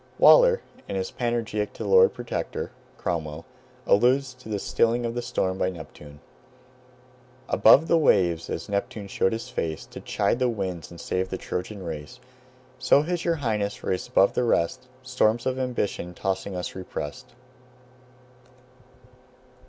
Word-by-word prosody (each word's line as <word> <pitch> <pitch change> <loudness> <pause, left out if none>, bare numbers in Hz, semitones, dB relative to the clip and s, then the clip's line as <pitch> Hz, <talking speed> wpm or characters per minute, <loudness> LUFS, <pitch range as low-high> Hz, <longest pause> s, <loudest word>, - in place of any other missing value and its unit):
Waller, - - +7 0.3
in - - -4
his 95 -1 -2
"Panegyric 115 -3 -2
to - - -6
the 100 - -3
Lord 95 -1 +7
Protector" 120 -1 -4 0.3
(Cromwell), 80 -2 -3 0.4
alludes 130 +5 +3
to 130 -3 -14
this 105 -2 -3
stilling 120 +1 +1
of 115 - -2
the 120 - -2
storm 95 -6 -2
by 90 - +1
Neptune: 75 -4 -11 1.3
"Above 155 +3 +6
the 170 - +4
waves, 85 - +2
as - - -4
Neptune 100 0 -3
showed 95 - +1
his 115 +3 -4
face, 80 -10 -3
To - - -10
chide 120 - 0
the 125 -1 +2
winds 95 -7 -4
and 85 - -12
save 95 +1 -2
the 95 - -3
Trojan 95 +2 -5
race, 75 -4 -7 0.6
So 145 - +4
has 175 +1 -2
your 170 -1 +1
Highness, 110 -8 -2
raised 95 - -2
above 100 - +4
the - - +1
rest, 100 0 0 0.2
Storms 120 -3 +1
of 130 0 -1
ambition 105 -8 -2
tossing 95 0 -3
us 90 - -4
repressed." 80 -6 -7
100 Hz, 150 wpm, -25 LUFS, 90-120 Hz, 1.3 s, Waller